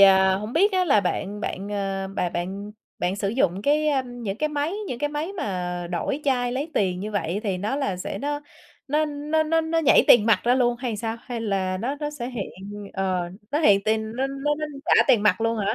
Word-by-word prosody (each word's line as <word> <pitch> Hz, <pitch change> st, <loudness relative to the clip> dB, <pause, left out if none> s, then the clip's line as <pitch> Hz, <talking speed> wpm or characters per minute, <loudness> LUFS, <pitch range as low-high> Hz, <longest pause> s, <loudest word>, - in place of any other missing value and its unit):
à, 190 Hz, -1 st, +7 dB
hổng 210 Hz, +4 st, -4 dB
biết 390 Hz, +7 st, +4 dB
á 370 Hz, -1 st, +3 dB
là 240 Hz, -, +4 dB
bạn 200 Hz, +2 st, -2 dB
bạn, 200 Hz, 0 st, -4 dB
à, 195 Hz, -1 st, -2 dB
bà 180 Hz, -, 0 dB
bạn 195 Hz, +5 st, -4 dB, 0.3 s
bạn 180 Hz, +2 st, -1 dB
sử 200 Hz, 0 st, -1 dB
dụng 195 Hz, -4 st, +1 dB
cái, 300 Hz, +3 st, +2 dB
a, 275 Hz, -3 st, +2 dB
những 240 Hz, -5 st, -5 dB
cái 305 Hz, -, +1 dB
máy 300 Hz, +3 st, -1 dB, 0.2 s
những 240 Hz, -, -4 dB
cái 295 Hz, -, 0 dB
máy 300 Hz, +5 st, -3 dB
mà 180 Hz, -, -3 dB
đổi 265 Hz, -, -2 dB
chai 245 Hz, -3 st, +1 dB
lấy 285 Hz, +5 st, -3 dB
tiền 185 Hz, -2 st, +1 dB
như 210 Hz, +2 st, -4 dB
vậy 190 Hz, -1 st, -1 dB
thì 195 Hz, -5 st, -1 dB
nó 210 Hz, +8 st, -1 dB
là 235 Hz, -10 st, -1 dB
sẽ 185 Hz, -, -5 dB
nó 290 Hz, +1 st, -2 dB, 0.5 s
nó 300 Hz, +3 st, +2 dB
nó 300 Hz, +1 st, 0 dB
nó 325 Hz, +1 st, +2 dB
nó 325 Hz, +1 st, 0 dB
nhảy 315 Hz, -, +5 dB
tiền 215 Hz, -3 st, +7 dB
mặt 225 Hz, -, +4 dB
ra 245 Hz, -, +4 dB
luôn 245 Hz, -2 st, +2 dB
hay 250 Hz, -2 st, -2 dB
là -, -, -3 dB
sao? 225 Hz, +1 st, -3 dB
Hay 240 Hz, -1 st, -5 dB
là 195 Hz, -4 st, -1 dB
nó 255 Hz, +7 st, -2 dB
nó 295 Hz, 0 st, -2 dB
sẽ 260 Hz, -5 st, -5 dB
hiện, 235 Hz, -6 st, -4 dB, 0.4 s
ờ, 185 Hz, -2 st, -1 dB, 0.2 s
nó 295 Hz, -, +1 dB
hiện 205 Hz, -10 st, +5 dB
tiền 220 Hz, 0 st, 0 dB
nó 265 Hz, -, +1 dB
nó 275 Hz, +2 st, -1 dB
nó 305 Hz, -, -2 dB, 0.2 s
trả -, -, +5 dB
tiền 220 Hz, -, +5 dB
mặt 215 Hz, +1 st, +3 dB
luôn 230 Hz, 0 st, +1 dB
hả? 200 Hz, -1 st, 0 dB
230 Hz, 240 wpm, -24 LUFS, 195-290 Hz, 0.5 s, à